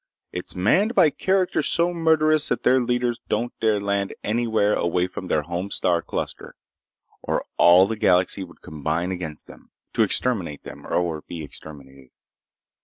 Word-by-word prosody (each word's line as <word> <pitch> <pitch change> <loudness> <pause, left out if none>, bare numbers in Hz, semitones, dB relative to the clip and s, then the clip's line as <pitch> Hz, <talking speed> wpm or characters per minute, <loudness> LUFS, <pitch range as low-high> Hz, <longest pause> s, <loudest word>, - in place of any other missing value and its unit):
It's 90 - -6
manned 185 - +2
by 155 - +5
characters 190 +2 0
so 170 +1 +1
murderous 155 -2 +3
that - - -1
their 130 0 +4
leaders 120 -1 0
don't 120 +1 -1
dare 110 -2 +2
land 100 -1 -2
anywhere 110 -2 +1
away 90 +1 +1
from 95 0 -7
their 75 -3 +1
home 85 +5 -4
star 90 -3 +1
cluster, - - -5 0.7
or - - -2
all 90 +2 +7
the 110 +3 -3
galaxy 95 -1 +2
would 85 -2 -14
combine 80 +4 -2
against 85 -5 -6
them, - - -16 0.2
to - - +1
exterminate 95 - -1
them - - -10
or 85 -3 -1
be 85 -2 -6
exterminated. 70 -3 -12
95 Hz, 155 wpm, -23 LUFS, 85-120 Hz, 0.7 s, all